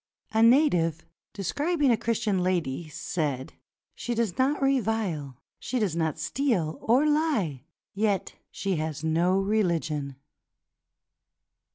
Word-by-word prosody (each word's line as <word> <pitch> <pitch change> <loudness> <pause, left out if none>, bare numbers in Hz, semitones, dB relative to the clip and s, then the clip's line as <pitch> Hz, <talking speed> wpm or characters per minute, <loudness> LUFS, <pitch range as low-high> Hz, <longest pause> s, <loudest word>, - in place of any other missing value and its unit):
A 220 - +2
native, 225 - +4 0.3
describing 290 - 0
a - - +5
Christian 220 -3 0
lady, 170 -4 -1
said, 145 -3 -3 0.4
*'She 240 - -4
does 225 -6 0
not 270 +3 +1
revile, 220 - 0 0.2
she 255 - -3
does 205 -8 0
not 160 -2 -1
steal 165 - -1
or 250 +6 +3
lie, 280 - 0 0.3
yet 205 -1 0 0.2
she 195 -3 -2
has 155 -1 -3
no 170 +4 +2
reUgion." 165 -9 0
190 Hz, 110 wpm, -27 LUFS, 160-235 Hz, 0.4 s, a